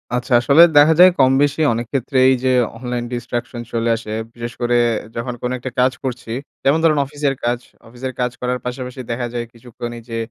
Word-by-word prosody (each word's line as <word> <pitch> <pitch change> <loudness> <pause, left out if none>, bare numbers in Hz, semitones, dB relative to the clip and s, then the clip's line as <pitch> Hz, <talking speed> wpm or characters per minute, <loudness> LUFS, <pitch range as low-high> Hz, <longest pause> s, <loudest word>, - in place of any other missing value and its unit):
আচ্ছা, 125 +1 -2
আসলে 140 +6 +5 0.2
দেখা 150 +2 +7
যায় 185 +1 +10
কম-বেশি 140 +3 +3
অনেক 120 +1 -3
ক্ষেত্রেই 130 -1 +3
যে 130 - +2 0.3
অনলাইন 125 0 -4
distraction 120 0 -4
চলে 115 0 0
আসে। 110 -1 -7 0.2
বিশেষ 120 0 -6
করে 120 0 +1 0.4
যখন 120 +2 -3
কোনো 125 +1 -2
একটা 125 +1 -6
কাজ 130 +1 +4
করছি, 125 -3 -5 0.3
যেমন 140 +4 +3
ধরুন 155 -3 +4
অফিসের 145 -1 -2
কাজ। 120 0 0 0.3
অফিসের 125 +2 -6
কাজ 125 0 0
করার 125 0 -1
পাশাপাশি 125 +1 -5
দেখা 120 +1 -2
যায় 120 -1 -3
কিছুক্ষণ 120 0 -8
এইযে 115 0 -7
125 Hz, 180 wpm, -19 LUFS, 120-135 Hz, 0.4 s, যায়